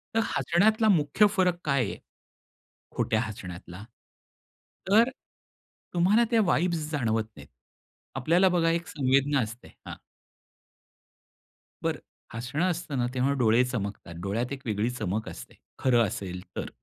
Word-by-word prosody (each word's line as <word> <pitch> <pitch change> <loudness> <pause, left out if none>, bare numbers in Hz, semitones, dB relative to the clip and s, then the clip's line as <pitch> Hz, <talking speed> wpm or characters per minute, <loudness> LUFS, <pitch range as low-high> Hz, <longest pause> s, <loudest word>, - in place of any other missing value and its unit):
तर - - +4 0.2
हसण्यातला 205 - +3
मुख्य 160 +2 +4
फरक 180 -3 +2
काय 140 -3 +2
आहे? - - -7 1.0
खोट्या 110 - +1
हसण्यातला? 90 -3 -8 1.0
तर, 225 +5 +5 0.8
तुम्हाला 195 +7 +4
त्या 230 - +4
वाइब्स 170 -3 0
जाणवत 115 -7 0
नाहीत. 70 -1 -12 0.7
आपल्याला 170 +8 +3
बघा 170 -2 +2
एक 170 +1 -1
संवेदना 140 0 +2
असते. 115 +1 -6 0.2
हां. - - -6 1.9
बरं. - - -1 0.3
हसणं 125 +8 -2
असतं 165 -5 -3
ना 120 - +1
तेव्हा 130 +2 +1
डोळे 115 +1 +4
चमकतात. 100 -7 -5
डोळ्यात 115 +6 -2
एक 135 - -7
वेगळी 110 0 0
चमक 110 -3 -3
असते, - - -11 0.2
खरं 120 -3 +3
असेल 90 -2 -5
तर. - - -4
135 Hz, 125 wpm, -27 LUFS, 110-170 Hz, 1.9 s, तर